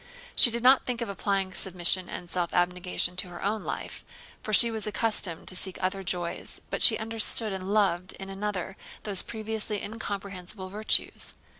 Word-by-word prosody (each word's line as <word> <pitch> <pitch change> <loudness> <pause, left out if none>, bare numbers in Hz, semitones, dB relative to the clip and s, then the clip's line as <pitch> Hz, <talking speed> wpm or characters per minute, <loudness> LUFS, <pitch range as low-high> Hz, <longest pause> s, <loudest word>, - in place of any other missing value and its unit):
She - - +7
did 235 0 -3
not 260 +1 +6
think 245 -2 -3
of 235 - -3
applying 195 -1 -1
submission 180 -1 +3
and 175 - -7
self 175 0 -2
abnegation 180 0 0
to 185 - -1
her 175 -1 -9
own 210 +2 -1
life, - - -6 0.4
for 215 - -5
she 230 +3 +7
was 220 -2 -3
accustomed 210 -6 -1
to 185 - -5
seek 185 0 0
other 190 +1 -2
joys, 175 -2 -4
but - - -3
she - - +9
understood 220 -1 +1
and 190 +1 -5
loved 190 -4 +1
in 195 - -9
another 195 -1 -4 0.3
those 205 -3 +2
previously 220 -1 -4
incomprehensible 200 -3 -6
virtues. 210 +3 -1
195 Hz, 170 wpm, -27 LUFS, 180-215 Hz, 0.4 s, she